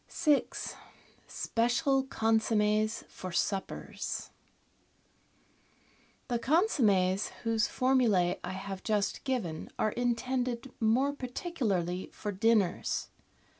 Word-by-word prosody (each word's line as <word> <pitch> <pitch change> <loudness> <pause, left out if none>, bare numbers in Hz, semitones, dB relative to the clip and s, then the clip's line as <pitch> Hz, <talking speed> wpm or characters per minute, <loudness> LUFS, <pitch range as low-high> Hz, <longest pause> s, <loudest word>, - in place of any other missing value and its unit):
6— 300 -4 +1 0.5
SPECIAL 265 +4 +1
CONSOMMES 220 -2 +1
FOR 185 - -7
SUPPERS 195 +3 -3 2.0
The 240 -2 0
consommes 220 - +3 0.2
whose 225 -2 +2
formulae 230 -9 +2
I 180 - -4
have 190 0 -6
just 210 -2 0
given 210 -13 -2
are 215 - +1
in 245 0 +1
tended 250 0 -2
more 250 +6 +3
particularly 235 - -2
for 210 - -4
dinners. 205 -2 +1
225 Hz, 90 wpm, -31 LUFS, 195-255 Hz, 2.0 s, consommes